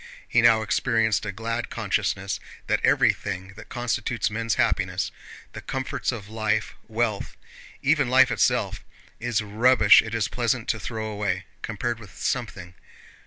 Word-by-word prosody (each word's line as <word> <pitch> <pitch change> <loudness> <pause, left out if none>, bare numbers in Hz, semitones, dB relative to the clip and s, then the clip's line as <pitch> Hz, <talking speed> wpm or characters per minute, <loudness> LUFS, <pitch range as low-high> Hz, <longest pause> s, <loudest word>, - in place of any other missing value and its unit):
He - - +3
now 110 -1 +5
experienced 110 0 +1
a - - -1
glad 115 +3 -3
consciousness 100 -3 -1 0.3
that - - 0
everything 95 -1 +2
that 115 - -12
constitutes 120 -2 -1
men's 115 0 -1
happiness—the - - -2
comforts 130 0 -2
of 110 -5 -7
life, 110 0 -1
wealth, 110 -2 -2 0.5
even 140 -2 +3
life 130 0 +5
itself—is 115 +1 -1
rubbish 110 +1 +6
it 110 0 -5
is 110 -3 +1
pleasant 120 -1 -1
to 110 - 0
throw 110 +1 -4
away, 100 -3 -2 0.2
compared 115 +2 -3
with 105 -5 -14
something... 100 -8 -3
110 Hz, 130 wpm, -25 LUFS, 105-120 Hz, 0.5 s, rubbish